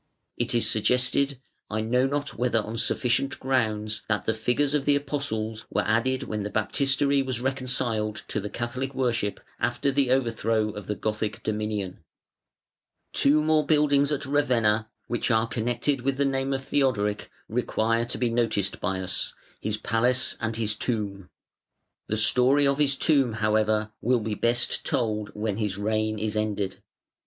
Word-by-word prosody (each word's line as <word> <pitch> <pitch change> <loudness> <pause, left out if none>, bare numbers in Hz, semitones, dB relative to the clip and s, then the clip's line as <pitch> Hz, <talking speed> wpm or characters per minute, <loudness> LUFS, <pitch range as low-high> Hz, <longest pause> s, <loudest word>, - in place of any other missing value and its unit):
It 120 0 -1
is 120 - +3
suggested, 125 +4 +2 0.3
I 110 +1 -1
know 125 +4 +2
not 145 0 -2
whether 120 -1 +1
on 110 +2 -6
sufficient 125 +3 +1
grounds, 110 -5 0
that 105 -1 0
the 110 - +2
figures 125 +6 0
of 145 -2 0
the 145 - +4
Apostles 135 -7 -2
were - - 0
added 120 +4 +1
when 105 -1 -3
the 100 - -3
Baptistery 135 +6 +1
was 130 -3 -2
"reconciled" 125 -4 -1
to - - -1
the 105 0 -5
Catholic 130 +4 -4
worship 115 -5 0 0.2
after 120 +4 0
the 135 -1 +1
overthrow 115 -4 +1
of 105 -2 -8
the 105 - -1
Gothic 105 0 -3
dominion. 105 -3 -3 1.1
Two 150 +2 +4
more 155 0 +3
buildings 145 -1 +3
at 145 -1 -1
Ravenna 115 -6 +2 0.2
which 120 +1 -1
are 110 -1 +3
connected 120 +4 -1
with 135 +1 -1
the 140 - +2
name 135 0 0
of 135 0 -2
Theodoric 110 -8 0 0.2
require 115 0 0
to 120 - -5
be 120 -2 0
noticed 115 -4 0
by 95 -2 -1
us, 95 0 -3 0.2
his 110 0 -2
Palace 120 +4 +1
and 115 -1 -1
his 110 -2 0
Tomb. 100 -5 -3 0.8
The 110 - -1
story 125 +6 +4
of 140 +1 +2
his 140 -2 +3
Tomb, 135 -6 +3
however, 110 0 +1
will 125 +1 +2
be 110 0 -2
best 120 +3 +1
told 105 -3 -1
when 105 -1 -2
his 105 -3 -2
reign 110 +1 0
is 110 0 -2
ended. 105 -3 -2
115 Hz, 160 wpm, -26 LUFS, 110-135 Hz, 1.1 s, the